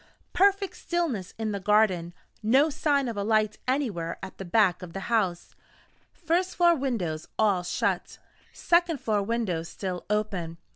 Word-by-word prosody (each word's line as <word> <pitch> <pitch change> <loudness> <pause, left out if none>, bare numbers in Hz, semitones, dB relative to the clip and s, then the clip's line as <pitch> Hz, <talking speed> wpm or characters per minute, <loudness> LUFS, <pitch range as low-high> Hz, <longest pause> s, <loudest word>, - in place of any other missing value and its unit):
Perfect 395 0 +2
stillness 300 - -2
in 220 -1 -2
the 200 - -3
garden: 190 -4 +2 0.3
no 265 +8 +4
sign 285 -2 +1
of 230 -3 -4
a 200 - -1
light 215 0 +1
anywhere 220 - -1
at 190 - -8
the 195 - -5
back 180 -1 +3
of 175 -2 -9
the 195 - -5
house: 190 -7 0 0.6
first 355 +2 -1
floor 345 -1 +5
windows 205 - -2
all 205 -4 +3
shut: 180 - -2 0.3
second 340 -3 +2
floor 215 -3 0
windows 195 -6 -2
still 185 -2 -5
open. 195 -6 -2
215 Hz, 150 wpm, -27 LUFS, 185-280 Hz, 0.6 s, floor